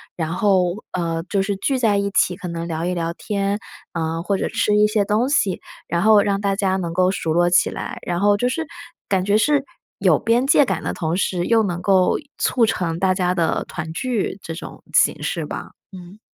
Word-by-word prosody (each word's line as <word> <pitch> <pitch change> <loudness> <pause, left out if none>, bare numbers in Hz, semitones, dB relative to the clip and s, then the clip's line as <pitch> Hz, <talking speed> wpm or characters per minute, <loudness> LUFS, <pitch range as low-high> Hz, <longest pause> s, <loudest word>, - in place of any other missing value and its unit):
然 160 -1 -3
后， 185 0 +1
呃， 165 -2 -2
就 200 - +1
是 195 +1 -1
聚 265 +6 0
在 220 -4 +2
一 200 0 -1
起 185 -1 +2
可 180 - -7
能 170 -1 -4
聊 165 0 -3
一 180 - -1
聊 170 -1 -2
天， 200 +2 -2 0.4
呃， 165 0 -2
或 195 +1 0
者 - - -1
吃 210 - +1
一 210 0 +5
些 215 -1 +1
东 215 +5 +1
西， 205 -11 +1 0.3
然 170 0 0
后 215 -1 +6
让 200 -1 0
大 200 -1 0
家 195 -2 0
能 170 -3 -3
够 185 +1 +3
熟 165 -4 -2
络 175 +1 +3
起 175 - +4
来。 - - -6
然 175 -1 -2
后 205 +1 +3
就 245 - 0
是 320 +5 -2 0.4
感 190 -2 +1
觉 205 +1 +2
是 285 +4 +2 0.3
有 - - +3
边 235 +3 +2
界 290 +1 +5
感 265 - -2
的 - - -2
同 165 -1 -2
时 180 -2 -1
又 225 -1 +4
能 175 -3 -3
够 190 -2 +3 0.2
促 240 -3 +2
成 175 -6 -1
大 190 -1 +2
家 180 -1 +1
的 170 -3 0
团 160 -1 -6
聚 220 -2 -2
这 165 - -5
种 165 - -9
形 - - +3
式 - - -2
吧， - - -7 0.2
嗯。 185 +2 -12
190 Hz, 235 characters per minute, -21 LUFS, 175-210 Hz, 0.4 s, 后